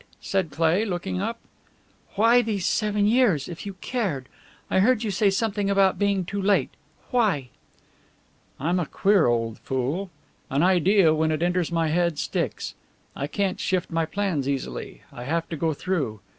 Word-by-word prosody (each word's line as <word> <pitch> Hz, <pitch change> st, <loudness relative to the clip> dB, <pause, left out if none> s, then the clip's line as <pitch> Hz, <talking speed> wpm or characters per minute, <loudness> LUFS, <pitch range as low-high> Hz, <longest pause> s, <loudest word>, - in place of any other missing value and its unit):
said 190 Hz, -4 st, -1 dB
Cleigh, 165 Hz, +7 st, +2 dB
looking 175 Hz, -, -3 dB
up. 230 Hz, -, -2 dB, 0.8 s
"Why 230 Hz, +4 st, +5 dB
these 210 Hz, -5 st, -2 dB
seven 210 Hz, -1 st, +1 dB
years 210 Hz, -, +3 dB
if 175 Hz, +3 st, -7 dB
you 195 Hz, -, -6 dB
cared? 185 Hz, -, -2 dB, 0.4 s
I -, -, +2 dB
heard 235 Hz, +3 st, +3 dB
you 215 Hz, -, -1 dB
say 200 Hz, +1 st, +3 dB
something 200 Hz, 0 st, 0 dB
about 195 Hz, -1 st, +3 dB
being 200 Hz, -2 st, +1 dB
too 200 Hz, +3 st, -3 dB
late. 200 Hz, +1 st, +2 dB, 0.4 s
Why?" 195 Hz, -, +1 dB, 1.1 s
"I'm 170 Hz, +6 st, 0 dB
a 170 Hz, -, -2 dB
queer 195 Hz, -2 st, +3 dB
old 115 Hz, -1 st, 0 dB
fool. 135 Hz, +9 st, -2 dB, 0.4 s
An 140 Hz, +4 st, +1 dB
idea, 185 Hz, -1 st, +4 dB
when 160 Hz, 0 st, +1 dB
it 155 Hz, +1 st, 0 dB
enters 175 Hz, -1 st, 0 dB
my 165 Hz, -2 st, +1 dB
head, 170 Hz, -1 st, +1 dB
sticks. -, -, -2 dB, 0.4 s
I 140 Hz, -, -3 dB
can't 195 Hz, +4 st, -1 dB
shift 185 Hz, -1 st, -1 dB
my 165 Hz, 0 st, +1 dB
plans 170 Hz, -7 st, -1 dB
easily; 130 Hz, -, -4 dB
I 120 Hz, -, -8 dB
have 165 Hz, +4 st, -1 dB
to 165 Hz, -, -3 dB
go 160 Hz, +1 st, 0 dB
through. 145 Hz, -, -2 dB
180 Hz, 165 wpm, -25 LUFS, 155-200 Hz, 1.1 s, Why